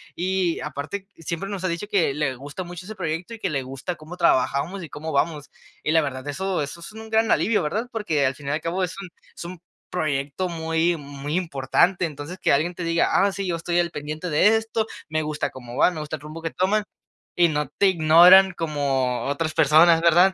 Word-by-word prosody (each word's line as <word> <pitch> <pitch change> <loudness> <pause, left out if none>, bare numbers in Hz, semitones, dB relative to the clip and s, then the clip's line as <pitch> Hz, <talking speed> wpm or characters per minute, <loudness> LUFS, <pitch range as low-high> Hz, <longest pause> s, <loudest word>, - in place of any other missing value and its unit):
y 185 -1 0
aparte, 150 +7 -5
siempre 170 +4 -4
nos 195 -2 -5
ha - - +2
dicho 170 +4 -3
que 185 -9 +1
le 140 -3 -1
gusta 145 +8 -7
mucho 175 0 -9
ese 215 +1 -8
proyecto 175 +4 -4
y - - -14
que - - -1
le 140 -3 -1
gusta 135 +7 -5
cómo 155 +3 -10
trabajamos 170 +2 +1
y 160 - -8
cómo 155 +3 -6
vamos. 150 0 -1 0.3
Y 150 - 0
la 160 - +5
verdad, 130 -3 -4
eso 190 +3 -2
eso 145 +4 -7
es 170 +5 -10
un 220 0 -10
gran 220 0 +2
alivio, 215 -3 +2
¿verdad?, 215 +11 -2
porque 165 - 0
al 130 0 0
fin 140 0 -11
y - - 0
al 155 +2 -1
cabo, 180 +3 -1
es 180 - -8
un 185 - -8 0.3
es - - -7
un 180 -1 -8 0.3
proyecto 150 +2 -2
muy 165 +1 0
muy 145 +1 -6
importante. 175 +2 +1
Entonces 150 +3 -7
que - - +2
alguien 160 +6 +1
te 175 - -5
diga: 165 0 +2
"Ah 200 0 +4
sí, 195 -1 -4
yo 175 - 0
estoy 170 +1 -1
al 170 -1 0
pendiente 155 +4 -5
de 195 +8 +4
esto, 225 0 -2 0.2
me 155 0 0
gusta 150 0 -2
cómo 120 -2 -10
va, - - +5
me 160 - -6
gusta 150 0 -4
el 145 - -20
rumbo 155 +2 -9
que 165 -1 -3
toman", 205 +3 +1 0.5
y 175 -1 +4
no 150 -2 -1
te 195 +6 +2
ignoran 180 +3 +7
como 140 -6 -1
otras 155 +3 -2
personas, 160 +3 +5
¿verdad? 175 +3 +5
165 Hz, 225 wpm, -23 LUFS, 150-185 Hz, 0.5 s, ignoran